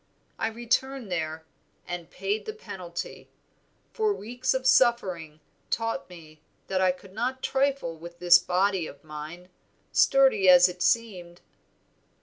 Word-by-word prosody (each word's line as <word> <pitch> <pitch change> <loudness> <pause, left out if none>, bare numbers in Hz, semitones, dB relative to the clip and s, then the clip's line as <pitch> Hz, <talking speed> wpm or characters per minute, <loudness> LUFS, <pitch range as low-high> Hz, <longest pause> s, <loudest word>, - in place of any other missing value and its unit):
I - - 0
returned 240 0 -2
there, 160 -2 -3 0.4
and 175 -1 -6
paid 195 - -3
the 435 - -3
penalty; 180 - -8 0.6
for 430 -2 +1
weeks 250 - -2
of 260 0 -2
suffering 185 -12 +2 0.3
taught 230 +1 -2
me 155 -3 -14 0.3
that 190 -1 0
I 185 -1 +4
could 185 +1 -13
not 250 +4 -3
trifle 270 -10 0
with 170 +1 -10
this 175 0 +7
body 185 -1 0
of 140 - -13
mine, 155 +4 -9 0.4
sturdy 265 -9 +4
as 180 0 +8
it 180 0 -8
seemed." 180 -7 -1
185 Hz, 130 wpm, -27 LUFS, 175-240 Hz, 0.6 s, as